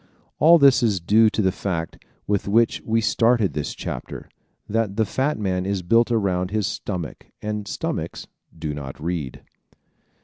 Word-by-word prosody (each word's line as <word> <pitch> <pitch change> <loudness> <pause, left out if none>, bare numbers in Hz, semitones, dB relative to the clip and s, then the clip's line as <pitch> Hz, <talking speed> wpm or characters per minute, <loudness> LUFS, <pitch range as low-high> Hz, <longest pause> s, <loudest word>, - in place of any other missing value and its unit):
All 165 +4 +7
this 140 -4 +5
is 105 -5 +2
due 110 +6 +4
to 105 - -1
the 95 - +3
fact 85 -3 -4 0.2
with 100 -1 -1
which 115 +3 +2
we 115 0 +1
started 115 - +2
this 75 0 -3
chapter 60 - -6 0.4
that 110 -2 -1
the 110 0 +2
fat 135 +9 -1
man 95 -3 -1
is 95 -1 -2
built 115 +7 +3
around 95 -5 0
his 105 0 -1
stomach 90 -4 -5
and 105 -1 -4
stomachs - - -4 0.3
do 80 -2 -4
not 70 -2 -7
read! 80 -5 -4
100 Hz, 160 wpm, -23 LUFS, 90-115 Hz, 0.4 s, All